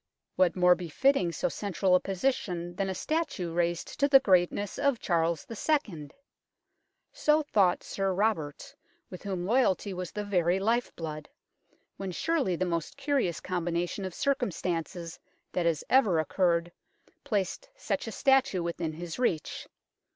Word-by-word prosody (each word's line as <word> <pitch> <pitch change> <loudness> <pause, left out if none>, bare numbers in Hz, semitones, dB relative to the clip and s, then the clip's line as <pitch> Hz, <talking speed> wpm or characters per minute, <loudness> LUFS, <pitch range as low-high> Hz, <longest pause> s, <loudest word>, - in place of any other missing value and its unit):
What 185 -2 +3
more 180 -1 +6
befitting 180 - +1
so 270 - -1
central 195 -5 0
a 180 - +6
position 180 -4 -2
than 195 +1 -1
a 190 - -3
statue 210 - -2
raised 170 0 -1
to 280 - +4
the 275 -1 +8
greatness 190 -2 +1
of 280 -3 +2
Charles 170 -5 0
II.? 220 - -1 1.0
So 305 +1 +3
thought 195 -10 +2
Sir 195 -1 -1
Robert, 185 -7 -1 0.4
with 180 - -8
whom 185 -3 -3
loyalty 205 -3 +2
was 180 -1 -5
the 210 - -4
very 180 -2 +1
life 230 +5 +1
blood, 155 -2 -6 0.7
when 195 -1 -4
surely 275 - 0
the 185 - -1
most 170 - -3
curious 275 - 0
combination 175 +1 -2
of 185 -2 -5
circumstances 180 - -2 0.3
that 175 -2 0
has 160 -4 0
ever 220 -10 +4
occurred 170 +1 +1 0.5
placed 200 -4 -2
such - - -2
a - - -4
statue 265 -10 +2
within 170 -1 -3
his 170 +5 -6
reach. 170 -11 -1
185 Hz, 145 wpm, -29 LUFS, 170-225 Hz, 1.0 s, the